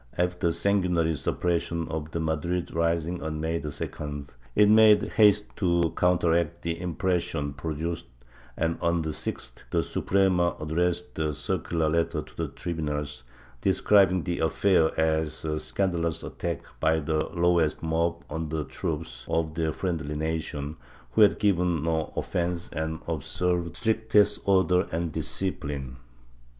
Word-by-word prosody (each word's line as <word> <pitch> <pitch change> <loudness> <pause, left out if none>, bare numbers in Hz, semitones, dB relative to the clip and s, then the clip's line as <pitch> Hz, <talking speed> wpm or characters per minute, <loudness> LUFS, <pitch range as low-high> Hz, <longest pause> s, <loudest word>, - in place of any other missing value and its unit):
After 90 0 +1
the 85 - +1
sanguinary 90 -5 +1
suppression 85 +1 -1
of 80 -1 -4
the 85 - -3
Madrid 80 +2 -1
rising 85 +1 0
on 80 -1 -3
May 80 +1 -1
2d, 75 0 -5 0.3
it 105 0 +6
made 110 0 +7
haste 105 -1 +4
to 85 -4 +2
counteract 85 -1 +2
the 85 0 -3
impression 85 -4 -1
produced 80 +4 -4 0.5
and, 80 0 0
on 85 -1 +1
the 80 - -2
Gth, - - -5
the - - +1
Suprema 95 -3 +2
addressed 85 +2 -1
a 75 -2 0
circular 80 +3 -1
letter 85 0 0
to - - -18
the - - -2
tribunals, 75 -6 -4 0.4
describing 95 -2 +4
the 90 -1 -2
affair 80 +1 +3
as 80 -1 0
a 75 -1 -1
scandalous 85 -4 -1
attack - - -4 0.2
by 80 0 +3
the 80 0 0
lowest 85 -3 +1
mob 85 +1 0
on 80 +1 -4
the 80 0 -2
troops 75 -5 -5
of 80 -1 0
a 80 -1 +1
friendly 80 -3 -3
nation, 80 -1 -3 0.3
who 110 - +3
had 105 -2 +6
given 90 -6 +2
no 80 -1 0
offence 85 0 -2
and 80 +1 -3
had 85 - -1
observed 85 +3 -1
the - - -15
strictest 110 -1 +2
order 95 -1 +3
and 85 0 -1
discipline. 70 -8 -3
85 Hz, 140 wpm, -27 LUFS, 80-90 Hz, 0.5 s, made